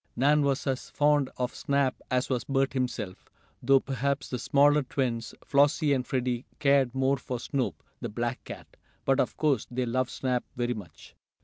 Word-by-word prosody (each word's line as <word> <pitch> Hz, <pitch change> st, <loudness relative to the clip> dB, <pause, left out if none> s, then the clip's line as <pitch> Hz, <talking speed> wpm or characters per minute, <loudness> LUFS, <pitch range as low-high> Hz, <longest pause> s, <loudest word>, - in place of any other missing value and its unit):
Nan 145 Hz, +4 st, +4 dB
was 140 Hz, -1 st, 0 dB
as 135 Hz, -2 st, -2 dB
fond 145 Hz, -2 st, +2 dB
of 125 Hz, -1 st, -2 dB
Snap 140 Hz, -2 st, 0 dB
as 125 Hz, 0 st, +1 dB
was 125 Hz, -3 st, -1 dB
Bert 135 Hz, -1 st, +1 dB
himself, 120 Hz, -7 st, -3 dB, 0.3 s
though 135 Hz, +2 st, +5 dB
perhaps 140 Hz, +1 st, -2 dB
the 125 Hz, -, -2 dB
smaller 145 Hz, +1 st, +4 dB
twins, 125 Hz, -4 st, -2 dB
Flossie 145 Hz, +1 st, +3 dB
and 125 Hz, -2 st, -1 dB
Freddie 125 Hz, -1 st, -1 dB
cared 140 Hz, -3 st, +3 dB
more 135 Hz, +1 st, +2 dB
for 125 Hz, -2 st, -5 dB
Snoop, 130 Hz, +2 st, -2 dB, 0.2 s
the 120 Hz, -, -4 dB
black 120 Hz, +3 st, -3 dB
cat. -, -, -10 dB, 0.3 s
But 135 Hz, 0 st, +3 dB
of -, -, 0 dB
course 145 Hz, -7 st, +1 dB
they 125 Hz, +1 st, -1 dB
loved 125 Hz, +1 st, 0 dB
Snap 125 Hz, -2 st, -1 dB
very 120 Hz, 0 st, 0 dB
much. 100 Hz, -8 st, -11 dB
130 Hz, 175 wpm, -28 LUFS, 125-140 Hz, 0.3 s, though